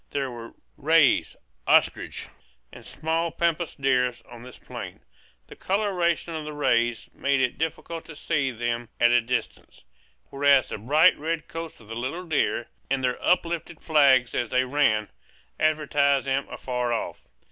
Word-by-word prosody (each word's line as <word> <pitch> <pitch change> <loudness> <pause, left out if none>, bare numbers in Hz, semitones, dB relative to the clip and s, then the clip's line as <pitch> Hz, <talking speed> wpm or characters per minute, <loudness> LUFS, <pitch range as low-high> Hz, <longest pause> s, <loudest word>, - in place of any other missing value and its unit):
There 135 -2 -2
were 115 -1 -10 0.2
rheas 155 0 +3 0.3
ostriches - - +2 0.4
and - - -12
small 165 +2 -2
pampas 170 0 -1
deer 130 -2 +2 0.2
on 120 -1 -10
this 125 -1 -12
plain; - - -9 0.4
the - - -13
coloration 185 -4 0
of 160 -1 -4
the 150 0 -6
rheas 120 -5 0
made 140 -1 0
it 125 -2 0
difficult 160 +1 -4
to 160 - -11
see 140 -2 -1
them 120 -1 -3
at 120 0 +5
a 120 0 +5
distance, 125 - -4 0.5
whereas 140 -1 +4
the - - -5
bright 150 - +4
red 160 +1 -3
coats 165 0 -7
of 110 - -17
the 115 - -7
little 135 +10 -4
deer, 145 -7 0 0.2
and 135 0 0
their 125 -1 -1
uplifted 170 -2 0
flags 140 -6 +4
as 120 -2 -1
they 130 0 +2
ran, 125 -6 +1 0.5
advertised 145 -3 +2
them 135 +1 -1
afar 125 -1 -3
off. 115 - -4
140 Hz, 155 wpm, -25 LUFS, 125-160 Hz, 0.5 s, at